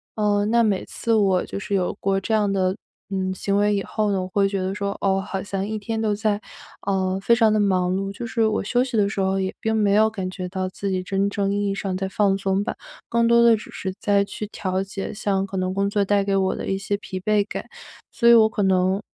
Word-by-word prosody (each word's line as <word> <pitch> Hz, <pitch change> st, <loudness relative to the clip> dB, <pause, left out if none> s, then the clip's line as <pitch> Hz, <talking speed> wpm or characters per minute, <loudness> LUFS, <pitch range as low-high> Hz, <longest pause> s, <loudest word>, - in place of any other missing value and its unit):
呃， 205 Hz, -1 st, +1 dB
那 235 Hz, +2 st, +3 dB
每 205 Hz, -4 st, 0 dB
次 230 Hz, -, -2 dB
我 195 Hz, -4 st, +3 dB
就 -, -, -5 dB
是 200 Hz, -, -5 dB
有 180 Hz, -2 st, 0 dB
过 195 Hz, 0 st, +1 dB
这 220 Hz, +3 st, -1 dB
样 205 Hz, -2 st, +2 dB
的， 185 Hz, -1 st, +1 dB, 0.3 s
嗯， 190 Hz, -1 st, -1 dB
行 200 Hz, +1 st, -1 dB
为 205 Hz, 0 st, +3 dB
以 200 Hz, -, 0 dB
后 210 Hz, +1 st, -1 dB
呢， 195 Hz, -1 st, 0 dB
我 185 Hz, -, -4 dB
会 195 Hz, +1 st, +2 dB
觉 195 Hz, -1 st, -2 dB
得 185 Hz, +1 st, -2 dB
说， 200 Hz, -1 st, -2 dB
哦， 195 Hz, -1 st, +2 dB
好 195 Hz, 0 st, -4 dB
像 195 Hz, 0 st, -3 dB
一 215 Hz, 0 st, -3 dB
天 225 Hz, +2 st, -3 dB
都 220 Hz, -1 st, +1 dB
在， 205 Hz, 0 st, 0 dB, 0.5 s
嗯， 190 Hz, -1 st, 0 dB
非 235 Hz, +4 st, +3 dB
常 225 Hz, -2 st, +4 dB
地 215 Hz, -, +2 dB
忙 185 Hz, -3 st, +2 dB
碌， 195 Hz, +1 st, -2 dB
就 205 Hz, -, -7 dB
是 230 Hz, -1 st, +1 dB
我 215 Hz, 0 st, 0 dB
休 245 Hz, +5 st, +1 dB
息 255 Hz, -2 st, -5 dB
的 200 Hz, -2 st, +3 dB
时 205 Hz, -, -4 dB
候 190 Hz, 0 st, +1 dB
也 190 Hz, 0 st, -1 dB
并 220 Hz, 0 st, 0 dB
没 205 Hz, -2 st, +2 dB
有 215 Hz, +1 st, +5 dB
感 190 Hz, -4 st, -4 dB
觉 185 Hz, 0 st, -5 dB
到 185 Hz, 0 st, -3 dB
自 195 Hz, +1 st, -4 dB
己 185 Hz, -1 st, 0 dB
真 195 Hz, +2 st, 0 dB
正 200 Hz, -1 st, 0 dB
意 205 Hz, 0 st, 0 dB
义 195 Hz, -, 0 dB
上 195 Hz, -2 st, -3 dB
在 190 Hz, 0 st, -2 dB
放 195 Hz, 0 st, +1 dB
松 195 Hz, 0 st, 0 dB
吧。 -, -, -4 dB, 0.3 s
更 235 Hz, 0 st, +2 dB
多 235 Hz, 0 st, +5 dB
的 235 Hz, -1 st, +6 dB
只 215 Hz, -, -11 dB
是 190 Hz, -, -4 dB
在 200 Hz, -1 st, +2 dB
去 205 Hz, +1 st, -6 dB
调 190 Hz, -2 st, -2 dB
节 195 Hz, 0 st, -5 dB
像 195 Hz, -2 st, -1 dB
可 195 Hz, -, -5 dB
能 185 Hz, 0 st, -1 dB
工 200 Hz, +1 st, 0 dB
作 205 Hz, 0 st, +1 dB
带 200 Hz, 0 st, +2 dB
给 195 Hz, 0 st, 0 dB
我 190 Hz, 0 st, +1 dB
的 -, -, -5 dB
一 195 Hz, -, 0 dB
些 200 Hz, +1 st, -2 dB
疲 190 Hz, -2 st, -6 dB
惫 210 Hz, +2 st, +2 dB
感， -, -, -5 dB, 0.4 s
所 235 Hz, -, +3 dB
以 235 Hz, -, +9 dB
我 220 Hz, -1 st, +7 dB
可 215 Hz, -1 st, -3 dB
能 190 Hz, 0 st, +2 dB
200 Hz, 280 characters per minute, -23 LUFS, 190-210 Hz, 0.5 s, 以